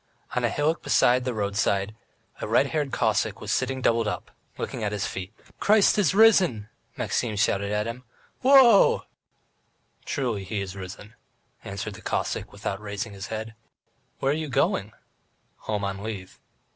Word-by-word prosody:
On - - 0
a - - +3
hillock 155 +3 0
beside 125 +1 +3
the 125 - -1
roadside 100 0 0 0.4
a - - -4
red - - +4
haired 150 -3 -1
Cossack 110 -2 0
was 105 - -4
sitting 130 +1 -1
doubled 115 -1 +2
up, 105 - -4 0.3
looking - - -4
at 105 - -1
his 105 -1 -2
feet. 95 +1 -5 0.3
"Christ 210 -1 +4
is 190 -2 +2
risen!" 185 - +5 0.3
Maxim 110 -3 -1
shouted 100 -1 +1
to 105 0 0
him. 120 +2 -6 0.4
"Wo 265 +2 +4
o 270 - +11
o!" 230 -5 +5 1.0
"Truly 120 -8 -2
He 100 +2 -3
is 100 -1 -5
risen," 95 +3 -9 0.5
answered 100 +2 -5
the 110 - -11
Cossack, - - -2
without 100 +1 -5
raising 105 0 -5
his 100 -1 -7
head. 110 0 -5 0.6
"Where 135 - +1
are - - +1
you 155 -1 -4
going?" 135 - +1 0.7
"Home 105 -2 -3
on 100 0 -3
leave." 100 -4 -7
110 Hz, 165 wpm, -26 LUFS, 100-135 Hz, 1.0 s, o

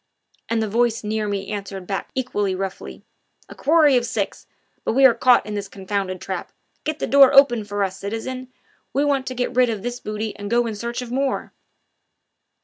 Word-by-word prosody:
And 225 -1 +1
the - - -1
voice 230 +1 +1
near 215 0 -1
me 200 -1 -3
answered 195 -2 -5
back 195 +1 -4
equally 205 -7 -1
roughly: 190 0 -6 0.5
"A - - -9
quarry 300 -1 +4
of 245 - +1
six 205 -3 -3 0.4
but - - 0
we 270 +2 +5
are 255 - +8
caught 240 -1 +4
in 210 - -5
this 200 -1 -3
confounded 195 -1 -3
trap - - -5 0.3
get 310 0 -2
the - - -2
door 275 -1 +7
open 270 -5 +6
for 205 0 -2
us, 190 0 -3
citizen 255 +5 -5 0.4
we 280 +2 +2
want 275 -2 0
to 255 - -4
get 245 0 -2
rid 250 -1 +4
of 215 -3 -3
this 245 0 -4
booty 215 0 -4
and 205 0 -6
go 240 +1 +2
in 225 - -3
search 235 +4 -4
for 240 0 -7
more." 270 +1 -1
225 Hz, 200 wpm, -22 LUFS, 205-255 Hz, 0.5 s, are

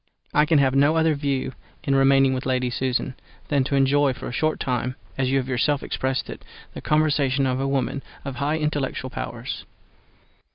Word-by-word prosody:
I 150 0 +4
can 160 -1 +4
have 135 -2 +3
no 145 +3 +4
other 160 -1 +3
view 140 -3 -1 0.3
in 140 - +1
remaining 135 0 +5
with 130 0 -3
Lady 125 -1 0
Susan, 130 +1 -1 0.4
than 140 -3 +3
to 140 - -1
enjoy 140 0 +3
for - - -8
a - - -5
short 155 +5 0
time 125 0 -1 0.2
(as 135 -1 0
you 135 - +2
have 130 -1 -1
yourself 135 +3 +1
expressed 130 0 -2
it) - - -8 0.3
the - - -7
conversation 145 -3 +2
of 130 0 0
a 135 - 0
woman 135 0 -1 0.2
of 135 -2 -5
high 145 +3 0
intellectual 145 -4 -2
powers. 120 +2 -5
135 Hz, 190 wpm, -24 LUFS, 130-145 Hz, 0.4 s, remaining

